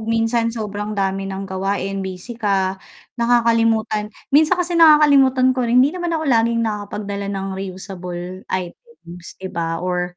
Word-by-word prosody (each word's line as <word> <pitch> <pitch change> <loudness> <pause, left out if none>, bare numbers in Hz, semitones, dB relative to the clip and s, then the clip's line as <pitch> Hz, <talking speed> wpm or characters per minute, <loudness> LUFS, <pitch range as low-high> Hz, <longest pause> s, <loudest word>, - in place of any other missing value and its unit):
minsan 225 +1 0
sobrang 210 -2 -4
dami 195 0 -1
ng 195 0 -5
gawain 195 +1 -3
busy 190 +4 -6
ka 195 -4 -1 0.4
nakakalimutan, 230 -3 +2 0.2
minsan 315 +5 +5
kasi 350 0 -1
nakakalimutan 285 -6 +5
ko 255 - -2
rin 250 +2 +5
hindi 285 - 0
naman 345 -2 -2
ako 315 - -3
laging 230 -3 +2
nakakapagdala 205 -1 -4
ng 195 -1 -3
reusable 185 -1 -7
items, 180 - -7
'di 190 0 -8
ba 165 -1 -2
or 180 0 -2
210 Hz, 140 wpm, -20 LUFS, 190-240 Hz, 0.4 s, minsan